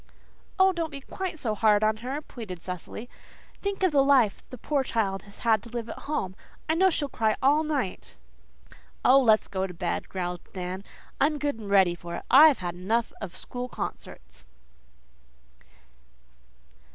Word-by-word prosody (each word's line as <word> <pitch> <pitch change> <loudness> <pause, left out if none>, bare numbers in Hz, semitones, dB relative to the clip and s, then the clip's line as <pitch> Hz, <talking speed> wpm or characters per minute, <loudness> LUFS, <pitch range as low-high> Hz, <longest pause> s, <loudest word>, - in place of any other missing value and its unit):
"Oh, 380 0 +5
don't 335 -2 -2
be 280 -2 -8
quite 370 +4 -5
so 230 -7 -1
hard 210 0 +3
on 215 0 +2
her," 265 +6 -5
pleaded 210 -11 -8
Cecily. 180 +5 -5 0.5
"Think 400 -1 -2
of 370 - +4
the 280 -2 +4
life 265 -7 +4
the 255 - -8
poor 280 +3 0
child 205 -6 -1
has 200 - -15 0.2
to 235 - -12
live 235 -1 -5
at - - -7
home. 190 -11 -2 0.3
I 315 - +2
know 380 +3 +4
she'll 300 -4 -1
cry 220 -5 0
all 285 +4 +4
night." 290 -11 -3 0.9
"Oh, 270 +2 +7
let's 220 -4 +4
go 190 0 -2
to 180 - -10
bed," - - -3
growled 180 -2 -3
Dan. 185 0 -4 0.4
"I'm 300 +2 +2
good 285 -5 -2
and 210 -2 -7
ready 190 -3 +5
for 175 0 -7
it. - - -6
I've 295 +2 +8
had 175 -2 -4
enough 215 +7 -1
of 185 -3 -6
school 250 0 -6
concerts." 60 - -7
230 Hz, 165 wpm, -27 LUFS, 195-285 Hz, 0.9 s, I've